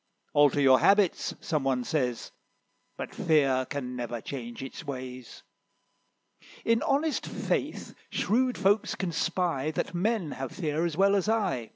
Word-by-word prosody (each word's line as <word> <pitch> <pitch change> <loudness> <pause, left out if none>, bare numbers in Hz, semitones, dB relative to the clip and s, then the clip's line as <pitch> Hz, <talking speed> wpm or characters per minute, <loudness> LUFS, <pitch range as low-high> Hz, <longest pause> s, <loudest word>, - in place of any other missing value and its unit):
'Alter 145 -1 +4
your 130 -2 +6
habits,' 200 -3 +3
some 155 -4 -1
one 130 -2 +1
says; 125 -5 -2 0.7
But - - -6
Fear 135 -5 +2
can 125 -3 -4
never 120 -1 -4
change 120 0 -7
its 135 +5 -8
ways: 130 -3 -7 1.2
In 230 0 +3
honest 295 +2 0
faith - - -2 0.2
shrewd 250 +4 +1
folks 200 +2 +2
can 185 -3 -2
spy, 170 -3 0
That 155 - -3
men 185 -2 0
have 135 -2 -5
fear 160 -2 -1
as 165 -2 -3
well 200 +1 +4
as 200 +2 +1
I." 190 - 0
155 Hz, 145 wpm, -28 LUFS, 130-195 Hz, 1.2 s, your